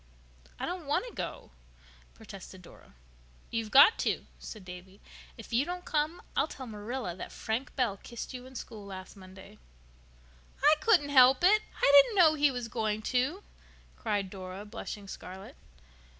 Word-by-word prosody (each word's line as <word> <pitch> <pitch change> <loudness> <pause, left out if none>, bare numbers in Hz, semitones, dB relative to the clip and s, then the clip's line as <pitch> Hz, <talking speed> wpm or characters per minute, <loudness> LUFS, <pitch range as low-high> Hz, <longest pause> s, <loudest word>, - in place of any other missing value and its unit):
"I - - -2
don't 355 -4 -5
want 290 - +1
to 475 - -10
go," - - -6 0.6
protested - - -11
Dora. 65 - -17 0.6
"You've 225 -2 -2
got 280 - +7
to," - - -1
said 215 -4 -9
Davy. 185 +2 -11 0.4
"If 225 0 -10
you 240 +4 +3
don't 355 +3 -6
come 310 +2 -1
I'll - - +2
tell 260 -4 -8
Marilla 215 -3 -5
that - - -8
Frank 230 +4 -4
Bell 235 -7 0
kissed 235 +5 -8
you 250 0 -8
in 260 - -15
school 220 -3 -8
last 190 -1 -9
Monday." 190 -1 -14 1.0
"I 300 +2 +7
couldn't 335 -6 +3
help 260 +1 +6
it. 420 +4 +6 0.2
I 280 - +5
didn't 420 +10 -5
know 335 -5 +6
he 295 -1 +3
was 245 -3 -4
going 220 -2 -2
to," 280 +11 0 0.5
cried 205 -4 -2
Dora, 190 +1 -8
blushing 210 -2 -7
scarlet. 190 0 -9
240 Hz, 160 wpm, -30 LUFS, 200-290 Hz, 1.0 s, got